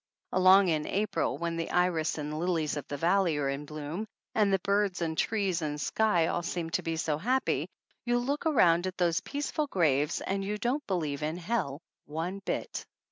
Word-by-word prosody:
Along 185 Hz, +1 st, +6 dB
in 155 Hz, -2 st, 0 dB
April, 210 Hz, +1 st, 0 dB
when 170 Hz, 0 st, -2 dB
the 165 Hz, -, -2 dB
iris 175 Hz, -3 st, +1 dB
and 150 Hz, 0 st, -4 dB
lilies 165 Hz, -3 st, 0 dB
of 145 Hz, -, -5 dB
the 145 Hz, -, -4 dB
valley 170 Hz, 0 st, +2 dB
are 140 Hz, -2 st, 0 dB
in 140 Hz, +2 st, -3 dB
bloom 155 Hz, +8 st, -5 dB, 0.3 s
and 210 Hz, -2 st, +3 dB
the 195 Hz, -, +4 dB
birds 200 Hz, -2 st, +1 dB
and 165 Hz, -2 st, -1 dB
trees 195 Hz, -3 st, 0 dB
and 150 Hz, -1 st, -3 dB
sky 180 Hz, 0 st, +2 dB
all 175 Hz, -, 0 dB
seem 170 Hz, -1 st, -3 dB
to -, -, 0 dB
be 165 Hz, -1 st, -2 dB
so 155 Hz, -2 st, -1 dB
happy, 255 Hz, +8 st, 0 dB, 0.3 s
you 240 Hz, 0 st, +1 dB
look 280 Hz, +6 st, -1 dB
around 175 Hz, -, +4 dB
at 185 Hz, -, -5 dB
those 170 Hz, -2 st, +2 dB
peaceful 295 Hz, +1 st, -2 dB
graves 150 Hz, -, +2 dB
and 195 Hz, 0 st, -2 dB
you 210 Hz, +2 st, -2 dB
don't 255 Hz, +7 st, -1 dB
believe 155 Hz, -7 st, -1 dB
in 155 Hz, +3 st, -2 dB
hell 175 Hz, -6 st, -2 dB, 0.2 s
one 170 Hz, +6 st, -4 dB
bit. -, -, -3 dB
175 Hz, 190 wpm, -30 LUFS, 155-200 Hz, 0.3 s, Along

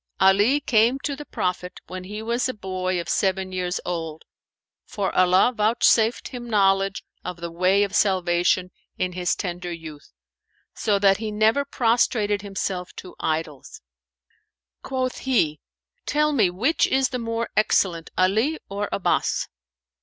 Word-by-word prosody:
"Ali 205 Hz, +9 st, +4 dB
came 240 Hz, -2 st, +3 dB
to 285 Hz, -, -2 dB
the 295 Hz, +1 st, -10 dB
Prophet, 180 Hz, 0 st, -3 dB
when 185 Hz, 0 st, -7 dB
he 210 Hz, +3 st, -6 dB
was 235 Hz, +3 st, 0 dB
a 255 Hz, -, -4 dB
boy 185 Hz, -2 st, -2 dB
of 170 Hz, -, -5 dB
seven 190 Hz, -1 st, 0 dB
years 180 Hz, -1 st, -2 dB
old, 165 Hz, -3 st, -4 dB, 0.6 s
for 200 Hz, -2 st, -3 dB
Allah 185 Hz, +6 st, +4 dB
vouchsafed 220 Hz, +1 st, +2 dB
him 240 Hz, -1 st, -8 dB
knowledge 195 Hz, -2 st, +2 dB, 0.2 s
of 180 Hz, -1 st, -5 dB
the 170 Hz, 0 st, -5 dB
way 185 Hz, +4 st, +3 dB
of 200 Hz, -, -3 dB
salvation 180 Hz, -1 st, +2 dB, 0.3 s
in 185 Hz, -, -1 dB
his 180 Hz, 0 st, 0 dB
tender 175 Hz, -1 st, -4 dB
youth, 160 Hz, -, -9 dB, 0.6 s
so 205 Hz, -2 st, +1 dB
that 195 Hz, -1 st, +4 dB
he 220 Hz, 0 st, -4 dB
never 220 Hz, +6 st, +2 dB
prostrated 225 Hz, -5 st, +1 dB
himself 190 Hz, -2 st, -4 dB
to 185 Hz, -, -10 dB
idols." 155 Hz, -3 st, -3 dB, 1.0 s
Quoth 255 Hz, -1 st, -3 dB
he, 165 Hz, -, +1 dB, 0.5 s
"Tell 300 Hz, 0 st, +2 dB
me 215 Hz, -9 st, +3 dB
which 230 Hz, -, +1 dB
is 265 Hz, -1 st, +2 dB
the 250 Hz, -, -3 dB
more 230 Hz, 0 st, -3 dB
excellent, 180 Hz, -5 st, +1 dB
Ali 215 Hz, -, +2 dB
or 200 Hz, +1 st, -3 dB
Abbαs?" 195 Hz, -, 0 dB
195 Hz, 145 wpm, -23 LUFS, 180-230 Hz, 1.0 s, Ali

